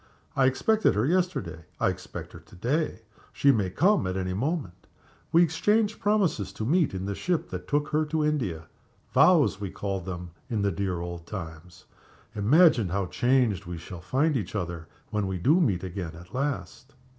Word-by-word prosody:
I 135 -1 +4
expected 215 +12 +2
her 105 +3 +2
yesterday; 150 - -1
I - - +3
expect - - -7
her - - -10
to - - -18
day 125 - -1 0.3
she 140 - +4
may 105 -7 +1
come 180 - +2
at 95 +1 -2
any 90 -1 -2
moment. 105 - -3 0.4
We 170 +2 +6
exchanged 210 +6 +1
promises 195 - +1
to 110 - -4
meet, 160 - +2
in 95 0 -3
the 100 - -2
ship 175 - -2
that 90 -1 -6
took 145 +1 0
her 155 +1 +2
to 155 0 0
India 95 - -1 0.5
'vows' 100 - +5
we 100 - -3
called 95 -2 -4
them 90 -2 -6 0.2
in 110 -4 -1
the 100 - +2
dear 90 -1 -2
old 85 -1 -6
times. 85 -3 -8 0.5
Imagine 120 - +4
how 100 +2 -1
changed 120 -3 +1
we 85 -1 -5
shall 85 +1 -9
find 135 - +1
each 105 -5 -3
other 85 -4 -4 0.2
when 105 -2 0
we 95 -1 -2
do 150 - +3
meet 100 - +1
again 90 -3 -5
at 90 +3 -13
last!" 140 0 -4
105 Hz, 180 wpm, -27 LUFS, 90-150 Hz, 0.5 s, We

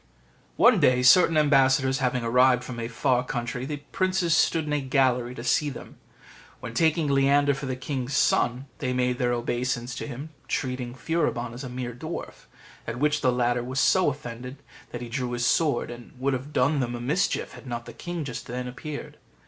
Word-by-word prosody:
One - - +5
day, 125 0 +4
certain 165 +5 +6
ambassadors 135 -2 +3
having 125 -2 0
arrived 125 +1 +4
from 120 -2 -7
a 115 - -3
far 125 +1 +1
country, 125 +1 -4
the 145 -1 -5
princes 185 -3 +1
stood 160 0 +2
in 150 - -2
a 145 - +1
gallery 130 -2 +1
to 120 - -7
see 145 +4 +2
them; 135 - -10 0.6
when, 115 - -7
taking 160 +4 +2
Leander 140 +1 +3
for 140 0 -5
the 130 - -2
king's 130 0 -3
son, 125 +3 +2
they 125 -2 -1
made 125 0 0
their 125 -1 +1
obeisance 120 +1 -2
to - - -5
him, 140 +3 -7 0.2
treating 125 -2 -3
Furibon 125 -6 -1
as 125 +3 -8
a 130 - -6
mere 125 -1 -5
dwarf, 155 +8 -7 0.4
at 115 - -4
which 150 +3 +1
the 130 - +3
latter 120 0 +1
was 130 +2 -3
so 185 0 +4
offended 125 -1 -7 0.3
that 120 - -7
he - - -6
drew 125 0 -3
his 120 0 -1
sword, 145 -2 +1
and 120 0 -11
would 135 +1 0
have 130 +3 -4
done 140 +1 +2
them 120 -2 -2
a - - -5
mischief 150 +11 0
had - - -12
not 120 -1 -4
the - - -10
king 175 -2 -5
just 125 -3 -6
then 125 +1 -4
appeared. 145 +4 -7
130 Hz, 195 wpm, -26 LUFS, 120-145 Hz, 0.6 s, certain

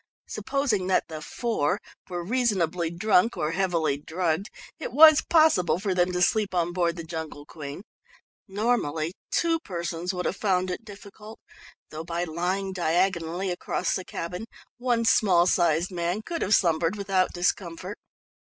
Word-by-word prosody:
Supposing 240 -10 -1
that 190 - +1
the 155 -1 -6
"four" 190 -3 -1 0.3
were 175 -1 -4
reasonably 185 -8 0
drunk 195 +5 +2
or 155 +1 -1
heavily 170 -6 0
drugged, 165 +5 -2 0.3
it - - -5
was 310 0 +8
possible 315 - +3
for 195 0 -1
them 180 0 +2
to 180 0 +1
sleep 210 -2 +1
on 175 0 0
board 170 -2 +1
the 170 - -6
Jungle 160 -3 -7
Queen. 145 +4 -8 0.6
Normally 190 -7 -1 0.2
two 330 -1 +1
persons 170 - -4
would 180 -1 -4
have - - -1
found 185 -3 +1
it 180 - -5
difficult, 210 +1 -12 0.5
though 155 +1 -6
by 170 +1 -3
lying 180 +4 -2
diagonally 175 +1 0
across 175 - -2
the 185 - -2
"cabin" 180 +4 -5 0.3
one 240 -2 +1
small 190 -7 +4
sized 170 0 +2
man 175 +4 -2
could 335 +4 -4
have 205 - +4
slumbered 165 +1 +2
without 195 -2 0
discomfort. 180 +2 -2
180 Hz, 150 wpm, -26 LUFS, 170-205 Hz, 0.6 s, was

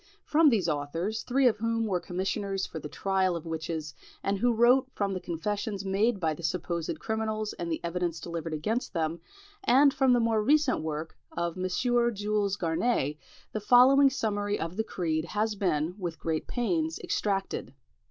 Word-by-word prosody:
From 305 0 +5
these 205 -9 +1
authors, 165 +8 -2
three 265 +2 +1
of 225 - +2
whom 230 0 0
were 190 -4 0
commissioners 195 +2 -2
for 160 - -7
the 150 - -7
trial 190 +2 0
of 170 - -6
witches, 160 -2 -4 0.3
and 195 0 0
who 245 +3 +3
wrote 245 +3 +4
from 200 -1 -1
the 185 - -2
confessions 200 +4 -3
made 200 +3 +1
by 160 -3 +1
the 155 - -9
supposed 170 0 -2
criminals 220 -1 -2
and 170 -1 -5
the 160 - -1
evidence 170 -1 -2
delivered 165 +1 -5
against 220 +11 -2
them, 165 -1 -1 0.4
and 275 -3 +5
from 265 -2 +3
the 245 - +4
more 225 -2 +2
recent 290 - +3
work 155 0 -4 0.2
of 170 -1 -1
M. 185 0 -2
Jules 210 -3 +1
Garinet, 160 - 0 0.4
the 215 - -3
following 260 +5 +6
summary 205 -5 -1
of 165 +2 -4
the 220 - 0
creed 160 -6 -2
has 210 +5 -1
been, 175 -5 0
with 170 -3 -4
great 160 -1 -2
pains, 170 -10 -1
extracted. 195 -2 -2
195 Hz, 170 wpm, -28 LUFS, 165-225 Hz, 0.4 s, following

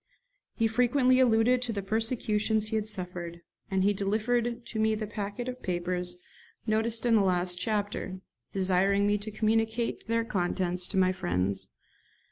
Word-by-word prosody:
He 230 - +1
frequently 250 +3 +3
alluded 245 0 +4
to 250 -2 -1
the 200 -3 -3
persecutions 220 0 0
he 220 - -2
had 215 0 0
suffered, 175 -3 -5 0.3
and 190 -2 +1
he 205 +1 +3
delivered 230 +4 0
to 220 - -5
me 220 0 +2
the 215 0 -3
packet 210 +3 -5
of 255 0 -5
papers 180 0 -2 0.5
noticed 225 +1 +1
in 235 - +3
the 220 - +5
last 180 -1 +1
chapter, 205 -3 -2 0.3
desiring 195 +1 +2
me 205 0 +2
to 210 +2 -3
communicate 225 +2 0
their 230 0 +1
contents 180 -3 -1
to 195 - -3
my 185 -1 +4
friends. 100 - -1
210 Hz, 155 wpm, -29 LUFS, 185-225 Hz, 0.5 s, the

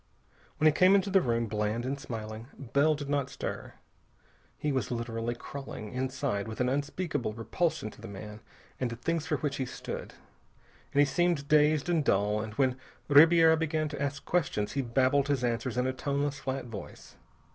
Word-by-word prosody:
When 155 - +1
he 155 - +8
came 185 +5 +5
into 195 0 +2
the 190 0 +5
room, 115 -4 0
bland 105 +2 -1
and 140 +2 -2
smiling, 110 -2 -6
Bell 140 +4 +2
did 145 -1 -6
not 140 -2 0
stir. - - -6 0.8
He 150 - -1
was 130 -5 -1
literally 115 -1 -3
crawling, 120 -5 -8
inside, 130 -5 -2
with 110 - -7
an 125 0 +2
unspeakable 145 -3 -2
repulsion 140 +2 -1
to - - -16
the 115 - -8
man 105 +1 -8 0.4
and 125 - 0
the 115 - -5
things 160 +6 -2
for 155 -2 +1
which 145 -2 -2
he 130 - -1
stood. - - -7 0.8
But 140 - +1
he - - +6
seemed 170 0 +1
dazed 150 0 +4
and 170 -3 +2
dull, 105 -2 +2
and 110 0 -6
when 130 -1 +2 0.3
Ribiera 160 +2 +7
began 155 -1 -1
to 145 -2 -6
ask 140 0 -3
questions 145 -12 0
he 140 - 0
babbled 130 +3 +2
his 140 -3 0
answers 120 +1 -1
in 125 - +2
a 130 - 0
toneless, 140 +2 -2
flat 135 -1 -3
voice. 110 -4 -9
135 Hz, 185 wpm, -30 LUFS, 115-150 Hz, 0.8 s, he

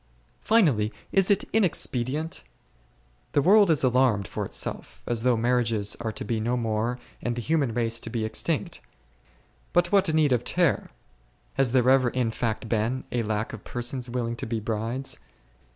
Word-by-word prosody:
(3.) - - -23 0.2
Finally, 110 - +1 0.2
is 195 0 +3
it 200 0 +3
inexpedient? 155 - 0 0.9
The 145 - +4
world 205 +1 +6
is 155 -4 +3
alarmed 125 -6 +2
for - - -4
itself, - - -4
as 120 -2 -1
though 125 -1 +2
marriages 115 -3 +1
are 115 -2 -3
to - - -6
be 115 -2 -1
no 120 +3 0
more 115 +1 -1 0.2
and 120 -1 -2
the - - -3
human 150 -4 +1
race 115 0 -1
to 115 - -7
be 110 -1 -2
extinct. 110 - -1 0.9
But 175 0 +2
what 195 -4 +3
need 155 -3 +3
of 125 -1 +2
terror; 175 +1 +1 0.6
has 135 -3 +1
there 125 -1 +3
ever 130 -1 +5
in 120 -2 -1
fact 110 0 -2
been 115 +4 -1
a 120 - 0
lack 105 0 -2
of 115 - -8
persons 125 +1 -3
willing 120 -1 -2
to - - -5
be 115 0 -2
brides 115 - -3
120 Hz, 170 wpm, -26 LUFS, 115-135 Hz, 0.9 s, world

